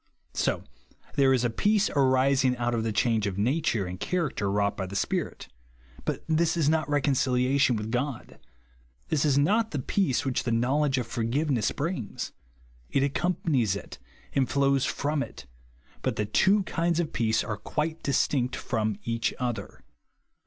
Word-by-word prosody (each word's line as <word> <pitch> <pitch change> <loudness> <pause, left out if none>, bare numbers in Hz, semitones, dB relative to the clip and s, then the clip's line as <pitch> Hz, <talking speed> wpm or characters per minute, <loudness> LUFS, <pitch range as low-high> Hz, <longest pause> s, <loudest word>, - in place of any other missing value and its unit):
So - - 0 0.5
there 135 -1 +4
is 130 -2 +3
a 120 - +2
peace 210 - +2
arising 130 -1 +3
out 120 0 0
of 115 -1 0
the 115 - -1
change 110 0 +1
of 95 -1 -3
nature 115 -2 +1
and 90 0 -6
character 150 - -1
wrought 100 0 +1
by 95 - -4
the 100 - -8
Spirit; - - -2 0.6
but - - -2
this 165 +1 +2
is 155 -4 +2
not 155 -2 +1
reconciliation 135 -2 +2
with 105 +1 -4
God. 125 +1 -3 0.7
This 155 -1 +1
is 140 -2 +3
not 210 +10 +3
the 150 - -3
peace 135 +1 0
which 130 -2 0
the - - -2
knowledGfe 130 +4 +2
of - - -5
forgiveness 120 +2 0
brinc^s. 145 - -4 0.6
It 135 - +1
accom 175 +6 0
panics 120 - +2
it, 100 - -8 0.3
and 135 -2 +1
flows 140 -1 +2
from 145 +1 -1
it, 70 - -7 0.6
but - - -1
the 105 - -1
tv/o 195 - +3
kinds 170 -1 0
of 165 -3 -2
peace 110 -1 +1
are 105 -2 -4
quite 160 +1 -3
distinct 130 -2 +1
from 110 -4 -1
each 115 0 -1
other. 125 -3 -4
130 Hz, 165 wpm, -27 LUFS, 115-150 Hz, 0.7 s, there